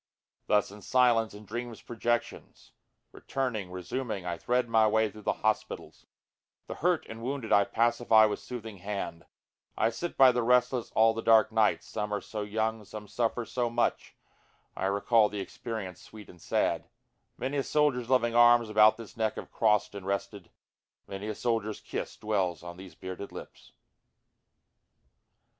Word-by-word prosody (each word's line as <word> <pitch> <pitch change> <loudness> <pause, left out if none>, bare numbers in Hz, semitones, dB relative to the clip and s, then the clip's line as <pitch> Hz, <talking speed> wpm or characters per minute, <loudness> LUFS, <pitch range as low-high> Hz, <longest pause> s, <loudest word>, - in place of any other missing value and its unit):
4 - - +3
Thus 105 -1 +2
in 105 +1 -12
silence 120 -2 +2
in 105 +1 -12
dreamsâ 120 +2 -6
projections, 120 0 -3 0.4
Returning, 115 -8 -3
resuming, 95 +2 -4
I 90 -1 -2
thread 125 +8 0
my 110 -1 +4
way 110 0 +2
through 110 - -12
the - - 0
hospitals, 110 -1 -2 0.6
The - - -6
hurt 175 0 +2
and 115 0 -9
wounded 130 -2 -4
I 100 -1 +5
pacify 115 -1 +4
with 105 - -1
soothing 115 -4 -8
hand, 100 -3 -5 0.5
I 115 - +2
sit 170 +9 -5
by 130 -1 +8
the 125 0 0
restless 125 0 +2
all 115 0 +5
the 115 - -4
dark 110 -1 +5
night, 110 -1 +2
some 105 0 -4
are - - -2
so 110 - -6
young, 110 +1 -2
Some 105 +1 -9
suffer 120 +2 -1
so 120 +1 -1
much, 120 +1 -1 0.6
I - - -3
recall 105 +2 +3
the 105 - -5
experience 95 -2 -6
sweet 105 -2 -13
and 90 - -19
sad, - - 0 0.5
(Many 135 +3 -2
a - - +2
soldierâs 135 -5 +1
loving 120 -3 +2
arms 120 -1 +6
about 110 0 +6
this 115 -2 -11
neck 110 -1 -1
have - - -8
crossâd 105 -3 +2
and 100 -2 -8
rested, 100 -1 -3 0.6
Many 100 +2 -6
a 110 - -2
soldierâs 115 -3 -2
kiss - - -5
dwells 95 -6 -1
on 85 0 -8
these 95 -3 -11
bearded 95 +2 -7
lips.) - - -11
110 Hz, 165 wpm, -29 LUFS, 105-120 Hz, 0.6 s, by